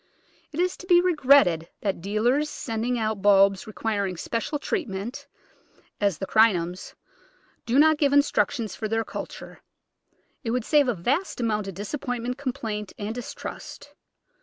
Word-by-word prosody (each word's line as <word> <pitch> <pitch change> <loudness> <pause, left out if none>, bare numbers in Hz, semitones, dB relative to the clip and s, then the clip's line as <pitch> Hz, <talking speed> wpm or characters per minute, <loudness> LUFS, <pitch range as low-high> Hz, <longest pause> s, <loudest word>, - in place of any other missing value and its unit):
It 310 - -6
is 360 +1 +1
to 365 - -12
be 350 -2 +6
regretted 280 - +4
that 195 -4 -2
dealers 240 - +1
sending 235 -2 -2
out 215 -3 -2
bulbs 195 -1 +4
requiring 200 -4 -2
spe - - -9
cial 295 +4 -3
treatment 240 - -4 0.4
— - - -33
as 200 -5 +2
the 195 - -4
Crinums— 185 -5 +2 0.7
do 240 +3 +2
not 310 +1 +5
give 285 -2 +3
instruc 285 0 +3
tions 230 -6 -5
for 220 - -3
their 225 +1 0
culture. - - -8 0.8
It 230 - -3
would 240 0 -1
save 295 -3 +4
a 245 - +1
vast 270 - -1
amount 215 -4 -1
of 195 - -6
disappointment, 245 - -4
complaint, 220 -6 -4
and 210 +1 -4
distrust. 245 0 -8
225 Hz, 155 wpm, -25 LUFS, 200-280 Hz, 0.8 s, be